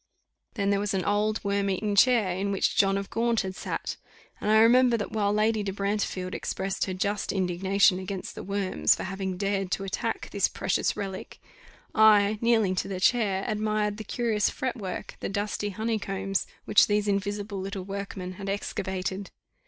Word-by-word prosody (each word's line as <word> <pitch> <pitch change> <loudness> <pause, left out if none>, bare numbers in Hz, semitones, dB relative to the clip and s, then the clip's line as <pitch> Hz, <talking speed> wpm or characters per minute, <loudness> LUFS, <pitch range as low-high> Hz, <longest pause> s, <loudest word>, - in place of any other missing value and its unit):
Then 200 -2 +1
there 200 - +2
was 205 -1 -1
an 185 -2 -1
old, 210 +1 +1
worm 200 0 0
eaten 205 +2 -1
chair, 215 -4 +4
in 200 +2 -1
which 195 - +1
John 195 0 +3
of 200 0 -5
Gaunt 230 0 +1
had 190 -1 -5
sat; - - -4 0.4
and 210 - -2
I 215 - +6
remember 240 +2 +5
that 205 - -4
while 205 -2 +1
Lady 215 +1 +2
de 200 -1 -2
Brantefield 200 -2 -2
expressed 190 0 -2
her 185 - -3
just 200 +2 -1
indignation 190 +1 +2
against 190 0 -5
the - - -7
worms, 200 -1 +1
for - - -6
having 190 -1 -4
dared 195 -1 -1
to 195 - -2
attack 195 0 -3
this - - +2
precious - - -1
relique, 195 -2 -6 0.5
I, 215 -1 +5
kneeling 225 -5 +3
to - - -1
the 190 -2 -4
chair, 195 -3 +2
admired 215 -1 0
the 220 - -6
curious 220 -1 0
fretwork, 235 -9 -4
the - - -3
dusty 205 +1 -2
honeycombs, 195 -2 -2 0.2
which - - +5
these 210 0 +1
invisible 200 0 -2
little 195 0 -4
workmen 195 -1 -5
had 195 +1 -6
excavated. 190 -1 -3
200 Hz, 175 wpm, -27 LUFS, 195-215 Hz, 0.5 s, I